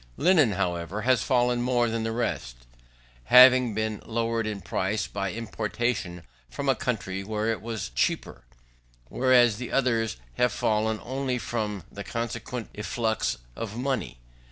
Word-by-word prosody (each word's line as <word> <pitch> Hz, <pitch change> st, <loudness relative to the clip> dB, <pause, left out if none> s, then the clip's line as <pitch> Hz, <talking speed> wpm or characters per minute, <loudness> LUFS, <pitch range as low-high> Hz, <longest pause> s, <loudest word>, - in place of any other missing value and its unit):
Linen, 155 Hz, -, +4 dB
however, 90 Hz, +1 st, -2 dB
has 125 Hz, -2 st, +3 dB
fallen 125 Hz, -1 st, +2 dB
more 120 Hz, -1 st, +2 dB
than 115 Hz, 0 st, -2 dB
the 115 Hz, 0 st, -2 dB
rest; 110 Hz, -, -2 dB, 0.7 s
having 125 Hz, -, +7 dB
been 110 Hz, -1 st, -2 dB
lowered 115 Hz, -1 st, -1 dB
in 105 Hz, -2 st, -3 dB
price, 100 Hz, +3 st, -1 dB
by 100 Hz, -2 st, -3 dB
importation 110 Hz, -4 st, -3 dB, 0.3 s
from -, -, -5 dB
a -, -, +5 dB
country 95 Hz, +1 st, -3 dB
where 110 Hz, +2 st, -2 dB
it 110 Hz, -, -3 dB
was 110 Hz, -, -5 dB
cheaper, -, -, -1 dB, 0.7 s
whereas 125 Hz, -4 st, +4 dB
the 125 Hz, +1 st, -6 dB
others 115 Hz, -, +1 dB, 0.2 s
have 125 Hz, -1 st, +3 dB
fallen 110 Hz, +1 st, 0 dB
only 130 Hz, 0 st, -2 dB
from 105 Hz, -5 st, -3 dB
the 100 Hz, -, -7 dB
consequent 115 Hz, 0 st, -5 dB
efflux 110 Hz, -, -1 dB, 0.2 s
of 110 Hz, -1 st, -5 dB
money. 130 Hz, -, -2 dB
115 Hz, 140 wpm, -26 LUFS, 105-125 Hz, 0.7 s, having